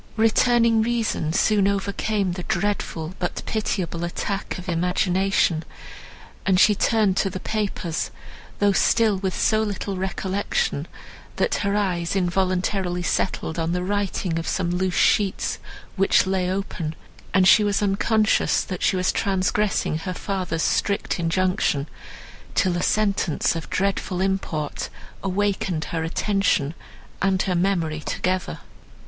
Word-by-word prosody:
Returning 230 +1 +4
reason 225 -8 0
soon 200 +3 +3
overcame 200 0 0
the 180 +1 -4
dreadful, 180 -4 -2
but 175 - -3
pitiable 185 -6 -2
attack 195 +3 -3
of 180 - -9
imagination, 180 0 +1 0.8
and 185 -1 +3
she 210 +3 +6
turned 205 -1 +2
to 195 - +2
the 185 - -5
papers, 195 -6 -2 0.5
though 205 0 +3
still 220 +1 +3
with 190 -1 -2
so 215 0 +3
little 200 -2 -3
recollection, 190 -4 -1 0.5
that - - +1
her 200 0 0
eyes 180 -4 0
involuntarily 185 0 0
settled 170 -2 -1
on 165 +1 0
the 180 0 -1
writing 190 -3 -1
of 165 - -5
some 175 -2 0
loose 180 0 0
sheets, 200 -3 +2 0.4
which 195 -1 +4
lay 190 -1 0
open; 185 -5 -3 0.4
and 190 -1 +4
she 210 +2 +7
was 205 0 +1
unconscious, 215 +2 +2
that 185 -2 -6
she - - +2
was 185 0 +1
transgressing 195 -3 0
her 180 +2 -4
father's 180 -5 -2
strict 200 -2 0
injunction, 165 -4 +1 0.7
till 185 -2 +2
a 175 - -1
sentence 195 -8 +1
of 165 - -5
dreadful 190 -2 -1
import 190 -6 -2 0.3
awakened 195 -4 -1
her 165 -1 -1
attention 175 -4 +1 0.5
and 190 0 +2
her 185 - 0
memory 175 -4 0
together. 185 +4 -2
190 Hz, 130 wpm, -23 LUFS, 175-200 Hz, 0.8 s, she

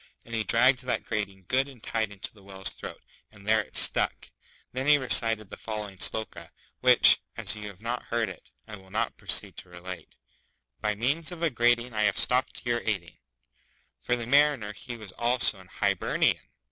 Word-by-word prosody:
and 115 - -11
he 110 -1 0
dragged 125 +4 +4
that 125 0 -2
grating 100 -4 -3
good 130 +4 +2
and 125 -5 -15
tight 110 -2 -1
into 100 -1 -6
the 105 - -18
Whale's 95 -1 -4
throat, - - -9 0.3
and 105 -1 -16
there 110 0 +4
it - - -6
stuck! - - +2 0.4
Then 130 +2 -3
he 150 0 +7
recited 115 -6 +4
the - - -7
following 105 -3 -6
Sloka, 85 -7 -4 0.3
which, - - +7 0.2
as - - -1
you 105 -1 -7
have 100 +1 -11
not 120 +1 -3
heard 115 -1 0
it, 95 - -10 0.2
I 105 -1 -8
will 95 -1 -18
now - - 0
proceed - - -2
to - - -9
relate 90 -1 -9 0.7
By 105 0 0
means 145 - -1
of 170 -1 -6
a 165 - +3
grating 120 0 +2
I 105 -1 +2
have 100 - +1
stopped 125 0 +1
your 120 0 +1
ating. 95 -6 -3 0.8
For 125 - +1
the 120 -1 -4
Mariner 140 -5 +3
he 120 +4 -8
was 105 -4 -10
also 120 -3 +1
an 95 - -15
Hi - - +1
ber - - -3
ni - - +5
an. - - -6
110 Hz, 200 wpm, -28 LUFS, 100-125 Hz, 0.8 s, he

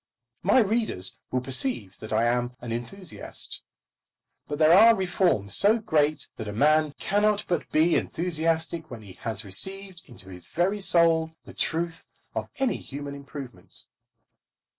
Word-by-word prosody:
My 200 +7 +3
readers 215 - +1
will 130 - -1
perceive 130 - -1
that 110 - -9
I 110 +1 +2
am 120 +1 0
an 120 - -7
enthusiast. 150 +10 -3 0.9
But 145 - -4
there 155 +1 +5
are 225 +5 +8
reforms 175 - +1
so 210 +3 +4
great 155 -8 +1
that 110 - -6
a 105 - -5
man 150 +5 +3
cannot 210 +1 +1
but 175 - -2
be 160 +2 +3
enthusiastic 165 -1 -1
when 115 -3 -9
he 95 -3 -12
has 110 -2 -3
received 190 - -2
into 95 -6 -10
his 90 -2 -11
very 185 +5 0
soul 165 -3 +3
the - - -12
truth 165 0 -2 0.3
of - - -4
any 270 -2 0
human 140 +1 -7
improvement. 140 -8 -10
155 Hz, 145 wpm, -26 LUFS, 120-185 Hz, 0.9 s, are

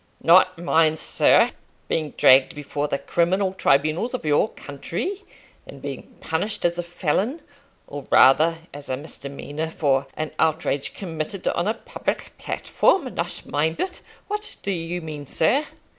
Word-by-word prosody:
"Not 185 +2 +6
mind, 165 -2 +2
sir, - - +3 0.4
being 155 -3 -2
dragged 130 +4 +6
before 145 0 -3
the 140 - -1
criminal 185 +6 0
tribunals 155 - +1
of 245 - -6
your 150 +8 +3
country, 170 - -5 0.5
and - - -11
being - - -8
punished 200 +6 -2
as 175 0 +1
a - - +2
felon, 175 - -1 0.5
or 145 -1 -8
rather 155 +6 +6 0.2
as 145 0 -9
a 130 - -1
misdemeanour, 145 +1 -5
for 140 -4 +1
an 155 0 -3
outrage 155 -3 0
committed 170 0 -5
on 170 - -1
a 220 - +1
public - - -4
platform! 275 -10 +1
Not 170 +1 -4
mind 160 +3 -1
it! 370 -1 -3 0.3
What 420 +1 -3
do 200 - -1
you 175 0 -3
mean, 150 -3 -7
sir?" 265 - +2
160 Hz, 145 wpm, -23 LUFS, 145-185 Hz, 0.5 s, Not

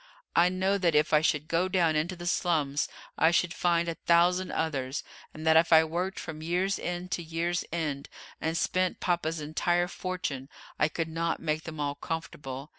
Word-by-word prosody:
I 175 +1 +6
know 190 +2 +1
that 170 -4 +2
if 150 +1 +3
I 150 - +6
should 150 -1 +1
go 170 +3 +1
down 175 -4 +2
into 165 +5 0
the 175 0 -8
slums 155 -5 +1 0.3
I 160 - +6
should 170 0 +2
find 170 -1 +1
a 170 - -1
thousand 175 +3 +3
others, 140 -4 -2 0.3
and 155 +1 -9
that 160 0 +5
if 165 +1 +5
I 160 0 +8
worked 175 +4 -2
from 155 -1 -7
year's 180 +4 0
end 180 +1 -4
to 175 - -1
year's 170 +1 -1
end, 150 -4 -3 0.3
and 160 +1 -1
spent 185 +1 0
papa's 170 -2 0
entire 175 +4 0
fortune, 180 -8 -4 0.3
I 150 - +4
could 165 +1 -3
not 165 +1 -1
make 155 0 -2
them 155 -2 -7
all 145 -1 0
comfortable. 145 -3 -5
165 Hz, 190 wpm, -29 LUFS, 155-175 Hz, 0.3 s, I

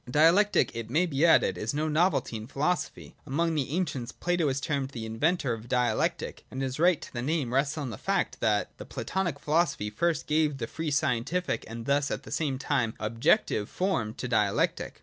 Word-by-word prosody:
Dialectic, 165 - +4
it 115 -1 -5
may 160 +8 +2
be 145 -3 -1
added, 160 - +4
is - - -2
no 155 +1 0
novelty 160 -4 +1
in 110 0 -6
philosophy. 150 +7 -2
Among 165 +5 0
the 145 -5 -1
ancients 140 -7 -2
Plato 175 -3 0
is 135 0 0
termed 140 -1 -2
the 115 -5 -6
inventor 135 +4 0
of 115 +1 -8
Dialectic; 125 -3 0
and 130 +1 -4
his 130 +1 -3
right 175 -1 +4
to - - -11
the 120 - -3
name 140 -2 -1
rests 140 +3 +1
on 140 -5 -3
the - - -8
fact, - - -1
that - - 0
the - - -7
Platonic 190 -2 -2
philosophy 150 -9 0
first 165 +7 0
gave 150 -2 +1
the 120 - -3
free 160 +7 -4
scientific, 145 +4 0
and 115 +1 -7
thus 140 +1 +2
at - - -3
the - - -11
same 145 -5 -1
time 130 -5 0
the - - -4
objective, 115 - +2
form 120 - -1
to 125 - -4
Dialectic. 105 -4 0
140 Hz, 200 wpm, -28 LUFS, 120-165 Hz, -, Dialectic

